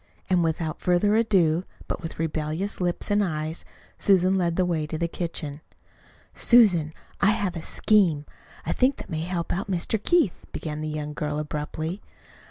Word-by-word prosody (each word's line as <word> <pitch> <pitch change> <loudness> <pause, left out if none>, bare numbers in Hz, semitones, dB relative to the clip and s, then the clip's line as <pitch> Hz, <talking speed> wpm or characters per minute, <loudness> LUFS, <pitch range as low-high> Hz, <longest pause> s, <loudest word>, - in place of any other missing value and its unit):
And 180 -2 +4
without 160 -1 -2
further 180 +4 +3
ado, 185 -7 +3 0.2
but - - -3
with 165 - -6
rebellious 160 +5 -2
lips 175 +3 -1
and 205 0 +3
eyes, 155 -2 -3 0.4
Susan 190 -1 +4
led 175 -3 +1
the 185 - +2
way 160 -4 -1
to 155 - -4
the 170 +1 0
kitchen. 160 -4 -5 0.7
"Susan, 185 -11 +5 0.3
I 200 - +5
have 200 -3 0
a 165 - -4
scheme, 170 -7 +2 0.4
I - - 0
think, 260 +2 +2
that - - -10
may 160 -1 -2
help 170 0 -2
out 195 +3 -3
Mr. 195 +4 0
Keith," 345 - +3 0.2
began 155 -1 -4
the 155 - -3
young 150 -1 -4
girl 150 0 -3
abruptly. 150 +4 -4
170 Hz, 170 wpm, -25 LUFS, 155-195 Hz, 0.7 s, Susan